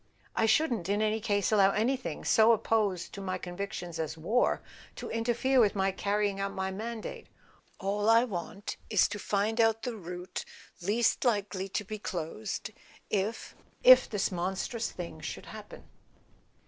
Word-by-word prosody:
"I 225 - +3
shouldn't, 235 - +2
in 205 +1 +2
any 215 +1 +1
case, 205 -3 +1
allow 200 -2 +6
anything 255 +4 -1
so 225 +1 +6
opposed 210 -5 0
to 200 - -6
my 185 -1 -2
convictions 180 -2 -5
as 160 0 -3
war 215 +10 +1 0.3
to - - -6
interfere 240 +3 +2
with 210 -4 +4
my 195 0 +2
carrying 200 0 0
out 195 0 -2
my 190 0 -2
mandate. 220 +3 -6 0.5
All 205 +2 0
I 230 +1 +7
want 195 -3 -5
is 210 -4 +4
to 205 0 -5
find 210 +4 +1
out 225 0 +2
the 250 - -1
A - - -7
SON 220 - -9
AT - - -14
THE - - -6
FRONT 180 - -4
route 180 +1 -6 0.4
least 230 +3 +2
likely 205 -5 0
to 210 - -2
be 215 +2 -6
closed 195 +4 -4 0.4
if—if 230 - +3
this 205 -2 0
monstrous 190 +6 -2
thing 170 -3 -7
should - - -6
happen." - - -10
205 Hz, 170 wpm, -30 LUFS, 190-225 Hz, 0.5 s, I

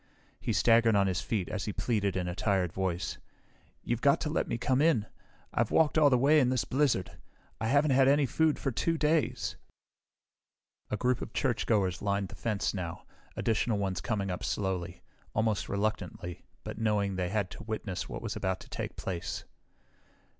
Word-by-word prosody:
He - - -2
staggered 115 -1 +4
on 100 -1 +4
his 95 -2 0
feet 100 -6 -1
as 105 - -3
he 105 - -3
pleaded 100 -5 0
in 90 -1 -1
a 90 - -2
tired 95 -2 0
voice. 95 -2 -2 0.6
"You've 120 0 -1
got 140 0 +4
to 150 - -1
let - - 0
me - - -1
come 130 +3 +1
in. 150 -10 +3 0.5
I've - - +1
walked 160 -2 +3
all 155 -2 +6
the 125 - +4
way 145 +5 +5
in 130 -3 +3
this 130 -2 +1
blizzard. 130 -9 +1 0.5
I 110 - -1
haven't 145 +4 +3
had 130 0 +5
any 140 +1 +4
food 155 +4 +2
for 135 - -2
two 165 +7 0
days." 155 0 +1 1.3
A 105 - -1
group 125 +3 +1
of - - -6
churchgoers 105 - +1
lined 100 -1 0
the - - -10
fence 110 -4 -1
now, 90 -3 -5 0.3
additional 115 0 +1
ones 95 -4 -1
coming 100 -1 -1
up 90 - -4
slowly, 90 -3 -2 0.3
almost 110 -2 0
reluctantly, 100 -4 -3 0.2
but - - -6
knowing 105 -3 +1
they 90 -1 -1
had 100 -2 -1
to - - -9
witness 105 -4 -4
what - - -6
was - - -3
about 95 0 -1
to - - -13
take - - -5
place. 85 -3 -4
110 Hz, 180 wpm, -30 LUFS, 95-130 Hz, 1.3 s, all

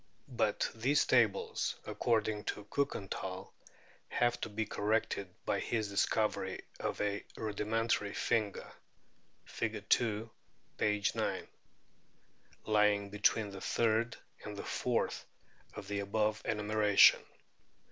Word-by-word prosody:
But - - +1
these 130 +6 +2
tables, 115 -6 +2
according 110 -2 0
to 105 - -3
Kiikenthal, 95 -7 -3 0.6
have 120 0 +1
to - - -3
be 110 +1 -2
corrected 105 -2 -1 0.2
by - - +1
his 110 -3 -1
discovery 105 +2 0 0.2
of - - -3
a 100 0 -1
rudimentary 110 0 -1
finger 105 -4 -1 0.7
(Fig. 110 -3 -4
2, 110 -1 +2 0.5
p. 105 -1 +1
9) - - -2 1.2
lying 105 -2 +3
between 105 0 +2
the 95 -1 -8
third 115 0 +1 0.3
and - - -7
the - - -5
fourth - - -1 0.5
of 100 - -7
the 100 0 -2
above 105 +2 0
enumeration. 105 -1 +5
105 Hz, 105 wpm, -33 LUFS, 100-110 Hz, 1.2 s, enumeration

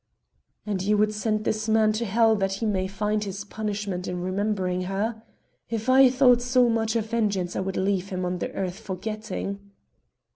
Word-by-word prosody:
"And 200 -3 -2
ye 205 +3 +2
would 210 +1 +2
send 215 0 -1
this 215 +1 -1
man 220 -1 +4
to 230 +2 -2
hell 225 +2 +3
that 195 -1 0
he 200 +4 -3
may 190 -3 0
find 210 +2 -1
his 200 0 -5
punishment 205 -3 -4
in 180 0 -3
remembering 185 0 -1
her? 220 +3 -2 0.5
If 225 +1 -2
I 265 0 +7
thought 250 -1 +5
so 250 0 +3
much 225 0 0
of 225 -2 +1
vengeance 200 -6 0
I - - -1
would 190 0 -3
leave 195 0 0
him 185 -2 -3
on 180 0 -2
the - - -3
earth 185 +1 -3
forgetting." 210 0 -5
210 Hz, 185 wpm, -25 LUFS, 190-220 Hz, 0.5 s, I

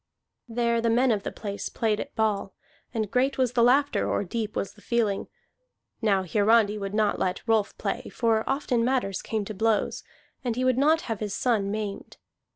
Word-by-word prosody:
There 235 0 +1
the 230 - +1
men 245 +2 +3
of 210 -2 +1
the - - -4
place 205 -1 -5
played 220 -2 0
at - - -6
ball, 205 -3 0 0.4
and 215 -3 -2
great 260 +3 +1
was 255 -2 +1
the 240 - +3
laughter 275 +4 +3
or - - 0
deep 215 +2 -4
was 195 - -2
the 210 - -19
feeling. 220 -4 0 0.7
Now 200 -4 +2
Hiarandi 210 +2 +3
would 200 0 -4
not 215 -1 +1
let 185 +4 -2
Rolf 220 -2 +1
play, - - -3
for 225 -2 +1
often 270 -4 +1
matters 240 -6 0
came 215 -2 -2
to 215 - -5
blows, 220 +1 0 0.4
and 240 -3 -1
he 255 +1 0
would 255 0 +3
not 315 +4 +4
have 225 -4 -4
his 205 -2 -3
son 220 -6 +1
maimed. 210 -1 -5
220 Hz, 190 wpm, -26 LUFS, 205-240 Hz, 0.7 s, not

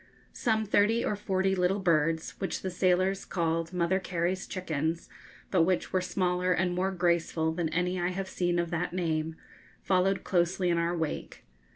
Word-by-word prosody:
Some 220 -2 0
thirty 215 +3 +3
or 210 - 0
forty 190 -1 0
little 185 +1 +2
birds, 165 -3 +1
which 190 - -3
the 190 - -2
sailors 185 +2 +2
called 165 -1 -1
Mother 180 +1 +1
Carey's 185 0 -2
chickens, 165 -2 -2 0.4
but 185 - +4
which 180 +2 +1
were 185 - +2
smaller 180 0 0
and 180 0 +1
more 185 +2 0
graceful 170 -3 +1
than 165 -1 -1
any 180 +2 0
I 175 - +1
have 190 +1 -4
seen 175 -2 0
of 170 -1 -1
that 170 +1 -2
name, 160 -3 -1 0.5
followed 190 +1 +2
closely 180 0 +1
in 170 - +2
our 170 +1 0
wake. 160 -2 -4
180 Hz, 170 wpm, -29 LUFS, 170-190 Hz, 0.5 s, but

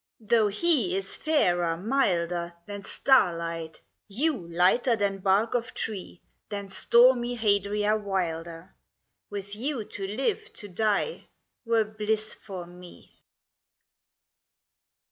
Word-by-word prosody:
L. 220 - -20
Though 225 -3 +5
he 210 - +1
is 195 0 -1
fairer, 175 - +1
milder, 175 -6 0
Than 205 -1 -7
starlight, 170 - +1 0.2
you 225 - -1
lighter 190 +8 +3
than 200 -2 -1
bark 195 +5 +2
of 245 0 -2
tree, 195 -4 -5 0.3
Than 200 -2 -5
stormy 240 +4 +4
Hadria 210 -1 +1
wilder, 170 -4 -3 0.6
With 200 0 -6
you 255 +1 -2
to 195 -1 -6
live, 330 - -2
to 205 - -8
die, 215 - -1 0.4
were 230 -1 +3
bliss 215 0 -2
for 190 -4 -8
me. 175 0 -14
205 Hz, 110 wpm, -27 LUFS, 180-230 Hz, 0.6 s, Though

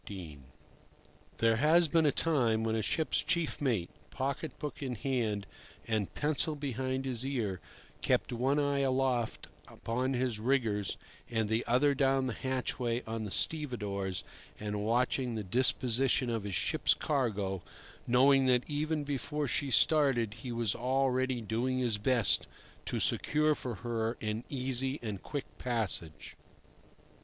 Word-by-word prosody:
XIII. 85 -8 -8 1.0
THERE 115 0 +3
has 160 +6 +5
been 160 0 +3
a - - +4
time 120 -9 +1
when 110 0 0
a 110 - 0
ship's 155 +8 0
chief 170 -4 -1
mate, 115 -11 0 0.2
pocket 140 +2 -3
book 150 0 -6
in 130 -3 -3
hand 110 -5 -1 0.4
and 110 -3 0
pencil 155 +1 0
behind 130 -1 -2
his 125 -2 -3
ear, 115 -9 -2 0.4
kept - - +1
one 130 +4 +1
eye 140 -1 +1
aloft 130 -3 0 0.2
upon 130 +3 -2
his 125 -3 -1
riggers 110 -5 0 0.3
and 115 -2 0
the 110 +2 0
other 135 +4 +4
down 135 -1 +2
the 125 - -2
hatchway 125 -2 -2
on 110 0 -4
the - - -4
stevedores, 100 - 0 0.4
and 105 -1 -3
watched 120 +4 +2
the 120 -4 -2
disposition 125 +3 +2
of 110 -3 -2
his 100 -3 -3
ship's - - +2
cargo, 105 - -1 0.5
knowing 135 +2 +5
that 125 -1 +3
even 150 +1 -1
before 145 +1 -2
she 140 +3 0
started 130 -5 +3
he 125 - -5
was 115 -3 +1
already 130 0 0
doing 120 +4 -1
his 120 -5 0
best 120 -1 +3 0.4
to - - -1
secure 150 +1 +2
for 125 -5 -5
her 115 0 -1
an 110 +1 -3
easy 130 0 -1
and 105 -4 -4
quick 145 -2 -4
passage. 105 -10 -2
125 Hz, 145 wpm, -32 LUFS, 110-135 Hz, 1.0 s, has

